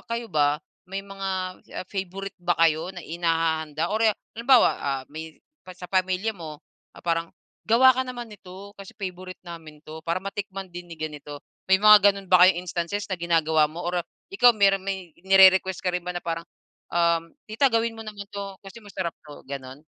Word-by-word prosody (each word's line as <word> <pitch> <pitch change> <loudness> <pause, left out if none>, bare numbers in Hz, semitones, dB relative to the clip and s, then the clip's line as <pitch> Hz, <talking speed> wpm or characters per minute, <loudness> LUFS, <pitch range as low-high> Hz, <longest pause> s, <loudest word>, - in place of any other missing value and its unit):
kayo 230 0 -3
ba, 145 -1 +3 0.3
may 195 +1 -4
mga, 195 -1 -6 0.5
ah, - - -21
favourite 195 0 -5
ba 175 0 +1
kayo 165 0 +3
na 180 - -7
inihahanda 165 -1 -1
or, 220 - 0
ah, 215 -2 +4 0.2
halimbawa, 240 +1 +5
ah, 135 -2 -2
may 160 0 -8 0.3
pa 185 - -9
sa 180 -1 -9
pamilya 185 +3 +1
mo, 155 -4 -9 0.4
parang, 165 -1 -1 0.4
"Gawa 255 +4 +6
ka 260 - 0
naman 240 -2 -6
nito, 200 0 -12
kasi 195 - -10
favourite 185 -2 -7
namin 160 -3 -10
'to. 155 +1 -9
Para 170 +2 0
matikman 195 -1 -6
din 175 0 -9
ni 165 - -8
ganito." 150 -2 -7 0.3
May 190 - +6
mga 210 -1 +8
ganun 195 -1 -10
ba 180 -1 +8
kayong 180 -1 +2
instances 180 +3 -3
na 190 - -2
ginagawa 160 -2 +2
mo 165 - -8
or 175 0 0 0.3
ikaw, 245 -11 +6
meron 195 -1 +3
may 190 -4 -5
nire-request 190 -1 +6
ka - - +1
rin 180 - -1
ba 180 - -3
na 175 - -3
parang, 165 0 -3 0.5
um, 170 -1 +1 0.2
"Tita 225 +6 +3
gawin 230 0 +1
mo 225 - -7
naman 205 -1 -7
'to, 200 -1 -7
kasi 195 +4 -11
masarap 190 -4 -4
'to," 150 -1 -12
ganon? 135 0 -7
185 Hz, 185 wpm, -25 LUFS, 165-200 Hz, 0.5 s, mga